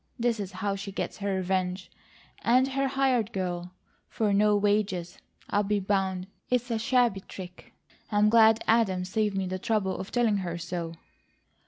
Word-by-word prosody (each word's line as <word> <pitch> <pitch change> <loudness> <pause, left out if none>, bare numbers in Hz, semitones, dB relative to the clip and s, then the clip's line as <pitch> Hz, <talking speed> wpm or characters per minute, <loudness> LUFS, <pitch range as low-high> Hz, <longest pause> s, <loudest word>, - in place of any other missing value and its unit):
This 235 -2 0
is 200 -2 -4
how 200 +2 -2
she 195 0 -6
gets - - -4
her 200 -1 -1
revenge, 185 0 -2 0.5
and 255 +3 +3
her 275 0 0
hired 260 -5 +1
girl, 180 -3 -3 0.4
for 210 -3 0
no 210 +1 +4
wages, 200 -4 0 0.3
I'll 205 - +3
be 205 0 0
bound! 190 -2 0 0.2
It's 245 0 0
a 225 - 0
shabby 240 -3 +2
trick. 185 -1 -11 0.4
I'm 210 0 +4
glad 225 0 +5
Adam 200 -5 +2
saved 205 +1 0
me 190 - 0
the 185 0 -3
trouble 195 -2 0
of 190 - -6
telling 230 -4 +2
her 175 -3 -3
so." 170 -1 -4
200 Hz, 165 wpm, -28 LUFS, 185-225 Hz, 0.5 s, glad